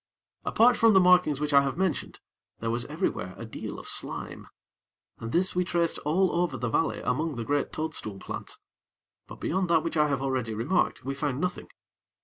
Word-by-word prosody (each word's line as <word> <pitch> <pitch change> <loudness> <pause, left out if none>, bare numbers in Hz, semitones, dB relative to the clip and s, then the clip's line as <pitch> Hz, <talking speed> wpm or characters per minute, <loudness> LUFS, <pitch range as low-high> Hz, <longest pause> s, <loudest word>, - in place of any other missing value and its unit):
Apart 240 +2 +5
from 225 -1 +5
the 190 - +7
markings 180 -6 +4
which 150 0 -1
I 140 - +8
have 140 +1 -2
mentioned, 185 -5 -2 0.4
there 115 0 -2
was 120 +1 -1
everywhere 150 - -3
a 115 - -7
deal 110 - -7
of - - -9
slime, - - -1 0.7
and 115 0 -5
this 185 +2 +1
we 180 - +2
traced 170 -2 0
all 175 +5 +1
over 165 -7 -1
the 120 -2 -2
valley 165 - 0
among 150 +4 -1
the 120 - -3
great 145 +4 0
toadstool 155 -10 -4
plants; - - -6 0.7
but, - - -11
beyond 185 0 -1
that 165 -2 +3
which 165 -1 -3
I 150 0 +4
have 140 -2 -1
already 130 -5 -1
remarked, 130 - 0
we 135 - -2
found 140 -2 -2
nothing. 180 +2 -3
150 Hz, 190 wpm, -27 LUFS, 130-180 Hz, 0.7 s, I